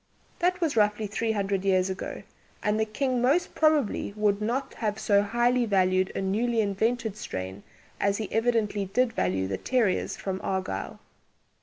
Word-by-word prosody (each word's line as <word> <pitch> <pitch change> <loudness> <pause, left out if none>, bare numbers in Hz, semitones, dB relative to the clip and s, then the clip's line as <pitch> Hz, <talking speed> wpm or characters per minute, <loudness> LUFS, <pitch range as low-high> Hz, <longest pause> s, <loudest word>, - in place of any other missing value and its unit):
That 360 +1 +1
was 320 -6 +1
roughly 210 0 +2
three 220 +2 -1
hundred 195 -2 -1
years 185 -1 +3
ago, 190 0 -5 0.4
and 210 +1 +1
the 220 - +2
King 250 +3 -1
most 280 +8 +2
probably 300 -10 +2
would 210 -1 +2
not 255 +5 -2
have 210 -2 -2
so 205 -2 +3
highly 240 +3 +1
valued 185 -2 +2
a - - -1
newly 225 +5 0
invented 220 +2 0
strain 95 - -6 0.4
as 200 0 +1
he 215 - -3
evidently 225 -3 +1
did 230 +5 +1
value 95 - 0
the 95 -1 -3
"terrieres" 235 -7 0
from 190 -1 -4
Argyll. 185 - -3
210 Hz, 160 wpm, -27 LUFS, 195-240 Hz, 0.4 s, years